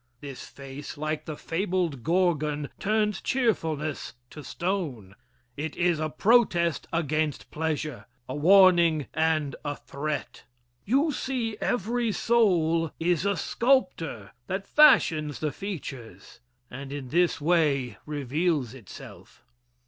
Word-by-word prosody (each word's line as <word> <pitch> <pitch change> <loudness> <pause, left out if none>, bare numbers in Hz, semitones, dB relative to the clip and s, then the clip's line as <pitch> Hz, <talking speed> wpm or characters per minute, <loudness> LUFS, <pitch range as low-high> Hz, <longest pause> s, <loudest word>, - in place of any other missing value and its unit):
This 140 -1 -8
face, 140 +2 -9
like 155 +1 -3
the 155 -2 -6
fabled 175 - -2
Gorgon, 155 -4 +1
turns 210 -1 0
cheerfulness 160 - -1 0.2
to 150 - -9
stone. 155 - -3 0.4
It 150 +1 -4
is 175 -2 +2
a 155 0 -1
protest 170 - +2
against 155 -2 -1
pleasure 155 -3 -3 0.2
a 130 - -5
warning 170 -1 +5
and 155 -4 +1
a 145 -1 -3
threat. 145 +2 -5 0.4
You 275 +9 +2
see 250 -5 -2
every 235 0 0
soul 170 -9 +2
is 175 +2 +1
a 200 -2 +1
sculptor 180 - 0 0.2
that 195 +1 -3
fashions 155 - +4
the 155 -1 -1
features, 130 - -8 0.3
and 135 +2 -8
in 140 -3 -6
this 175 +3 +2
way 145 - +1
reveals 145 -2 -1
itself. 120 -8 -13
160 Hz, 115 wpm, -27 LUFS, 145-190 Hz, 0.4 s, warning